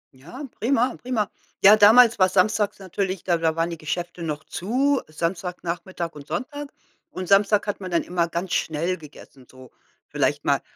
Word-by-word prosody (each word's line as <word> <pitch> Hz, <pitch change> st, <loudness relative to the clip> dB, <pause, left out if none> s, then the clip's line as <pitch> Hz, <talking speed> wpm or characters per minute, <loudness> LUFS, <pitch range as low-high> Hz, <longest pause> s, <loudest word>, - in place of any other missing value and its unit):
Ja, 175 Hz, -, -10 dB, 0.2 s
prima, 245 Hz, +1 st, +1 dB
prima. 235 Hz, -5 st, -1 dB, 0.4 s
Ja, 205 Hz, +2 st, +9 dB
damals 225 Hz, +2 st, +6 dB
war 185 Hz, 0 st, +5 dB
samstags 205 Hz, +2 st, +1 dB
natürlich 190 Hz, -1 st, -3 dB
da 175 Hz, -2 st, +1 dB
da 160 Hz, -1 st, +1 dB
waren 165 Hz, +1 st, -1 dB
die 165 Hz, -, -7 dB
Geschäfte 170 Hz, +2 st, -4 dB
noch 155 Hz, -2 st, -4 dB
zu, 265 Hz, +8 st, 0 dB
Samstagnachmittag 175 Hz, +1 st, -4 dB
und 145 Hz, -1 st, -12 dB
Sonntag. 290 Hz, +2 st, -5 dB, 0.4 s
Und 185 Hz, -, -6 dB
Samstag 200 Hz, +1 st, +4 dB
hat 205 Hz, -1 st, -3 dB
man 185 Hz, -, -5 dB
dann 170 Hz, -1 st, +1 dB
immer 175 Hz, -1 st, -1 dB
ganz 170 Hz, +2 st, -4 dB
schnell 165 Hz, +4 st, -1 dB
gegessen, 140 Hz, -4 st, -15 dB
so 130 Hz, -1 st, -15 dB, 0.4 s
vielleicht -, -, 0 dB
mal -, -, +2 dB
185 Hz, 165 wpm, -23 LUFS, 165-210 Hz, 0.4 s, Ja